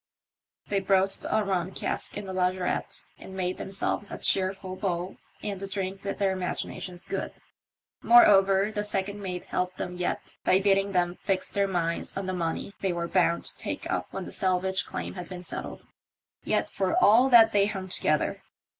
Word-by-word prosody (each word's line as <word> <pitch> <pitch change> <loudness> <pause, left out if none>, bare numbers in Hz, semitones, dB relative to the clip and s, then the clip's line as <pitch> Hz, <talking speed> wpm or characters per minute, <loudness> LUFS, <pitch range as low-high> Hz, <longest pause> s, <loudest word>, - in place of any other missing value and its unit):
They 200 - +1
broached 195 0 +1
a 220 - +2
rum 185 -1 -1
cask - - -3
in 205 - -5
the 190 - -6
lazaretto 185 0 -1
and 190 - -10
made 180 -1 -2
themselves 195 +1 -2
a - - -5
cheerful 190 0 +3
bowl, 185 -1 -3 0.3
and 200 -2 -3
the 195 - -5
drink 195 0 -4
did 200 - -4
their 195 -2 +1
imaginations 180 -1 -3
good. - - -4 0.7
Moreover, 200 -3 +6
the 210 -1 -2
second 205 0 -3
mate 180 -2 -5
helped 180 0 -2
them 180 - -4
yet 180 - -3
by 185 - +4
bidding 195 0 +2
them 175 -1 0
fix 190 -2 -1
their 200 0 +1
minds 170 -2 -2
on 195 - -3
the 185 - -2
money 170 +2 -3
they 190 - +1
were 170 0 -3
bound 170 -2 +2
to - - -6
take - - -3
up - - -1
when - - -6
the - - -8
salvage 190 0 +2
claim - - -5
had 180 -2 -8
been 180 -1 -7
settled; - - -7 0.6
yet - - 0
for 190 -1 0
all 240 +6 +6
that 225 -3 +7
they 200 -1 +3
hung 190 -3 -5
together. 155 -4 0
190 Hz, 180 wpm, -27 LUFS, 180-200 Hz, 0.7 s, that